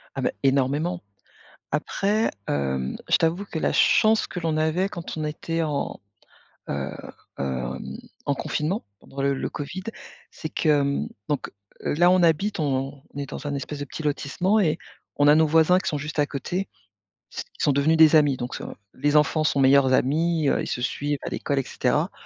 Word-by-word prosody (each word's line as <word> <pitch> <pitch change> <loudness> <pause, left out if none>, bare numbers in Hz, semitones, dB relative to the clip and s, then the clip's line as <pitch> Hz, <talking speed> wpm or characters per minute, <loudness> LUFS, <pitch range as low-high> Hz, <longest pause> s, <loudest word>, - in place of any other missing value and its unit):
Ah, - - -3
bah, - - +2
énormément. 140 +6 +1 0.7
Après, 200 +8 0 0.2
hem, 65 -2 -1
je - - +5
t'avoue 170 +5 0
que 165 - -4
la - - 0
chance 220 0 +4
que 180 - -6
l'on 165 -2 -1
avait 160 +5 +1
quand 170 -4 -7
on 155 - -2
était 165 +2 -2
en, 150 -3 -2 0.7
heu, - - -3 0.5
hem, 65 -1 -3 0.4
en 140 - +1
confinement 160 +10 -2 0.2
pendant 135 - -9
le 140 0 +2
le 135 - -3
Covid. 160 +6 -5 0.5
C'est 155 - -6
que, 155 - -1
hem 140 -2 +2 0.2
donc, 145 -2 -2 0.3
heu, - - 0
là, 175 +3 +5
on 185 0 +4
habite 170 +4 +2
on 135 -1 -2
est 140 -1 -3
dans 140 - -7
un 145 - -2
espèce 140 +1 -5
de - - -2
petit 145 - -7
lotissement 165 +8 +1
et 160 -6 +1 0.4
on 145 - +4
a 145 - +8
nos 160 +1 +5
voisins 160 +3 +5
qui - - -3
sont 150 - -1
juste 155 +2 -6
à 145 - +2
côté. 175 +7 -3 0.7
S - - -3 0.2
ils - - -2
sont - - +4
devenus 140 +4 +3
des 160 0 +7
amis. 145 -3 +4
Donc, 120 +1 -5
heu, - - -6 0.3
les 145 +2 0
enfants 150 +1 +3
sont 150 -2 +1
meilleurs 135 -1 +5
amis, 155 +4 +2
heu, - - +1
ils - - -4
se 125 - -3
suivent 145 +3 -1
à - - -3
l'école 140 - -2
et 135 - +2
cetera. - - 0
150 Hz, 195 wpm, -25 LUFS, 140-165 Hz, 0.7 s, a